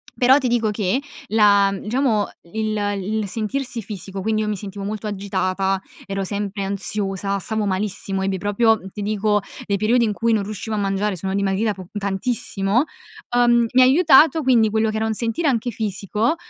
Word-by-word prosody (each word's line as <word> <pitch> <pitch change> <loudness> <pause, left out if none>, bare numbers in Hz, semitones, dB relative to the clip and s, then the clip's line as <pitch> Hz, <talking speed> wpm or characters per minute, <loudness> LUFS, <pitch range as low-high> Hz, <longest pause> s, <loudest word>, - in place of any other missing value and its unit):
Però 260 +2 +5
ti 265 - 0
dico 235 -2 +1
che 210 +4 0 0.3
la 200 -2 +4
diciamo 215 0 0 0.2
il 215 -1 -1 0.2
il 215 +1 -2
sentirsi 235 +4 -2
fisico, 195 -1 -7
quindi 215 +1 0
io - - -3
mi 210 - -1
sentivo 200 0 -7
molto 215 +1 -4
agitata, 195 -1 -1 0.2
ero 195 0 -3
sempre 200 0 -3
ansiosa, 200 0 -1
stavo 220 +2 -2
malissimo, 195 0 -1
ebbi 190 0 -1
proprio 215 +3 +2
ti 205 - -7
dico, 210 0 +1 0.2
dei 200 -1 0
periodi 235 +4 +2
in 210 - -1
cui 230 +2 0
non 210 -2 +1
riuscivo 215 +2 -5
a 210 - -1
mangiare, 195 0 0
sono 190 +2 -4
dimagrita 200 +2 0
po 185 -3 -11
tantissimo. 200 +2 0 0.5
Uhm, 240 -1 +4
mi 255 - +6
ha - - +8
aiutato 310 +2 +5
quindi 235 -4 +4
quello 220 0 +1
che 215 - -3
era 220 0 0
un 220 - -1
sentire 235 +9 -1
anche 245 -2 0
fisico 210 - -1
210 Hz, 180 wpm, -21 LUFS, 195-230 Hz, 0.5 s, ha